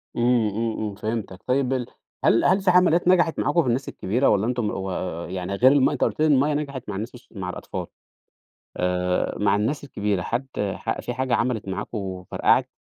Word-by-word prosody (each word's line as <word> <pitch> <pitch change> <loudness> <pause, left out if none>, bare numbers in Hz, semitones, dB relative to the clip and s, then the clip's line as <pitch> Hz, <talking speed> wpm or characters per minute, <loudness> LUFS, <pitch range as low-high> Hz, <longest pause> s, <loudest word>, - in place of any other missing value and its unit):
امم، 120 -2 +3
امم، 110 +2 -2
امم، 105 -2 -3
فهمتَك. 110 -3 -4
طيب 130 0 +1
ال 125 -2 -2 0.4
هل 115 - +4
هل 190 +2 +4
في 190 -1 +4
حملات 175 -1 +4
نجحت 175 -3 +3
معاكم 150 +4 +2
في 140 - -3
الناس 125 +3 0
الكبيرة، 120 +8 +1
والَّا 105 +1 +2
أنتم 120 -4 0
و 95 0 -4 0.4
يعني 95 +1 -3
غير 130 +6 +6
الم 140 -2 +4
أنتَ - - -1
قلت - - -1
لي 155 - +4
الميَّة 145 +1 +3
نجحت 140 -4 -3
مع 100 - -3
الناس 110 +6 -5
الص 125 - -15
مع 95 -4 -5
الأطفال؟ - - -6 0.9
آآ، 90 0 0
مع 105 0 +3
الناس 125 +9 -1
الكبيرة 105 -7 -1
حد 120 +8 -2
ح 100 -1 -2
في 120 - -4
حاجة 130 -1 0
عملت 115 -5 -1
معاكم 100 +4 -4
وفرقعت؟ 95 -3 0
115 Hz, 195 wpm, -24 LUFS, 100-135 Hz, 0.9 s, غير